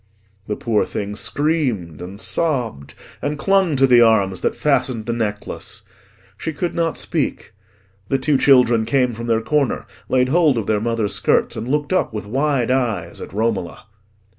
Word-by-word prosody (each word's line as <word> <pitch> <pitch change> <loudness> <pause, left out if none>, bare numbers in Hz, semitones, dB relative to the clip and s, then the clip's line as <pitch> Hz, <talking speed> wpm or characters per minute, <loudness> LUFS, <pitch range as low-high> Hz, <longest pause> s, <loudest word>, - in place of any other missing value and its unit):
The 105 - -2
poor 110 -1 +1
thing 105 0 -4
screamed 125 - -1
and 95 +3 -8
sobbed, 125 - -1 0.3
and 145 +1 -2
clung 190 -1 +2
to 135 0 +4
the 125 -2 +6
arms 100 -5 +3
that - - 0
fastened 130 -6 0
the 115 - -1
necklace. 105 -3 -4 0.6
She 160 - -3
could 170 +4 -2
not 165 -1 -1
speak. - - -3 0.5
The 135 - +1
two 140 0 +1
children 125 -5 +5
came 125 +1 +1
from 115 +1 -6
their 115 -1 +2
corner, 145 +3 0 0.2
laid 130 0 +2
hold 155 -4 +3
of 110 - -1
their 105 0 0
mother's 115 -2 -1
skirts, - - +1
and 115 - -5
looked 145 +4 0
up 185 - +1
with 105 - -4
wide 135 +1 0
eyes 115 -10 -1
at - - -8
Romola. 105 -5 -2
120 Hz, 165 wpm, -20 LUFS, 110-145 Hz, 0.6 s, the